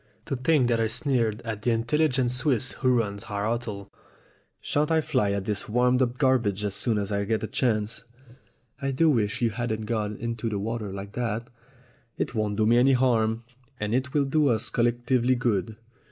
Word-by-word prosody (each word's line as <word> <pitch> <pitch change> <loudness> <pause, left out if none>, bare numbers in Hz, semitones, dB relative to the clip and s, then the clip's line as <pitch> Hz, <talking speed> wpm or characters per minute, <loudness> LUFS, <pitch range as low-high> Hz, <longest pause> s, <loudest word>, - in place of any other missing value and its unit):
To - - -2
think 130 0 +2
that 115 -1 +1
I 115 - +2
sneered 115 -2 0
at 110 -2 -4
the 120 - 0
in 115 -1 +1
telligent 130 -1 +1
Swiss 130 -1 +1
who 130 -2 +2
runs 100 -3 -2
our 100 0 -3
hotel. 110 -4 -3 0.7
Shan't 150 +1 0
I 160 -1 +3
fly 135 -9 +1
at 100 -1 -2
his 105 0 -2
warmed 125 +3 +3
up 125 -1 0
garbages 120 -8 +2
as 100 -2 -1
soon 115 +1 0
as 100 0 -2
I 100 0 0
get 110 +2 -1
a - - -1
chance 110 -3 0 0.4
!" 120 +3 -35
"I 135 - -1
do 155 +4 +3
wish 110 -2 0
you 115 - +2
hadn't 110 0 -2
gone 105 -2 -2
into 115 -1 -3
the 105 - -2
water 110 0 -3
like 100 +1 -7
that." 115 0 -3 0.7
"It - - -2
won't 105 -2 -1
do 110 +1 +2
me 120 +2 +5
any 135 +2 +5
harm, 115 -3 +2 0.4
and 105 +1 -2
it 130 +1 0
will 145 0 +2
do 150 +2 +2
us 110 -4 +1
col 120 - +2
lectively 120 +1 +1
good. 110 -3 0
115 Hz, 205 wpm, -26 LUFS, 105-130 Hz, 0.7 s, me